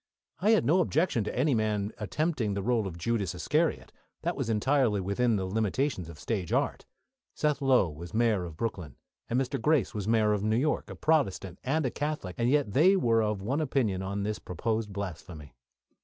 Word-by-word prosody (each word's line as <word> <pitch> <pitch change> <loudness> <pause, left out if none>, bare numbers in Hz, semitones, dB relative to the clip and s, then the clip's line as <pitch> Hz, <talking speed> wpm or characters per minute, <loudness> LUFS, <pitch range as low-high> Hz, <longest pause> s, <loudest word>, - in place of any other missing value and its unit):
I 200 +5 +2
had 220 -1 +4
no 170 +6 +4
objection 160 - +1
to - - -4
any 140 +3 +3
man 105 -2 0
attempting 115 - -1
the 100 - -2
role 115 -3 +1
of 85 -3 -7
Judas 100 0 -1
Iscariot. - - 0 0.3
That - - -1
was - - -3
entirely 115 -1 +2
within 105 +5 +1
the 95 -2 -1
limitations 105 - -1
of 85 - -10
stage 95 -4 -3
art. - - 0 0.5
Seth 150 -1 0
Low 130 -8 +4
was 80 +2 -9
Mayor 110 -4 +2
of 85 -3 -8
Brooklyn, 90 - -4 0.3
and 120 - +1
Mr. 135 -1 -2
Grace 150 -4 +2
was 105 -2 -4
Mayor 110 -2 +3
of 105 - -1
New 110 +1 +2
York 150 +5 0
a - - -7
Protestant 95 - 0
and 145 +3 0
a 125 - 0
Catholic 145 -11 -3
and 120 +1 +2
yet 140 -7 +1
they 180 +8 +5
were 115 -11 +3
of 105 -3 -1
one 135 +9 0
opinion 120 -10 0
on 100 +1 -3
this 105 +1 -2
proposed 110 +4 -2
blasphemy. 85 -6 -7
110 Hz, 195 wpm, -29 LUFS, 100-135 Hz, 0.5 s, they